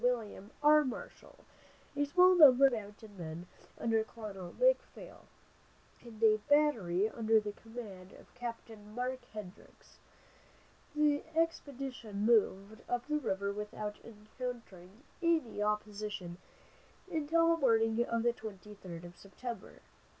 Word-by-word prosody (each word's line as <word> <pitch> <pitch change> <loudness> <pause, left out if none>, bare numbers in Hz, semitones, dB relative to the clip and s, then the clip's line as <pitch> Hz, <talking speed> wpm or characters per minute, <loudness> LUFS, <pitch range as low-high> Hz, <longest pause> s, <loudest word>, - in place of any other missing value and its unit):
William 225 -5 -1
R. 300 0 +7
Marshall, 255 -4 -8 0.5
a 290 0 +1
small 360 +5 +6
number 275 -6 +8
of 270 - +5
mounted 205 -2 -8
men 165 +1 -6 0.3
under 225 -1 +1
Colonel 205 -6 -8
McPhail, - - 0 0.7
and 230 -2 -10
a 215 -1 +6
battery 225 -11 +3
under 225 0 +2
the 210 -1 -4
command 205 -4 -10
of - - -17
Capt. 235 -2 -6
Mark 245 +5 -5
Hendricks. 205 -4 -12 1.0
The 295 -1 +3
expedition 270 -10 -2
moved 215 -2 +2
up 245 0 -1
the 300 0 0
river 200 -6 -2
without 210 0 -5
encountering 215 -2 -9 0.2
any 320 -11 +1
opposition 210 -4 -3 0.7
until 330 +1 +2
the 330 - -3
morning 225 -2 +3
of 230 -1 -1
the 240 0 +3
twenty 210 -3 -9
third 175 -4 -9
of 175 0 -11
September. 230 +5 -9
225 Hz, 120 wpm, -33 LUFS, 205-260 Hz, 1.0 s, number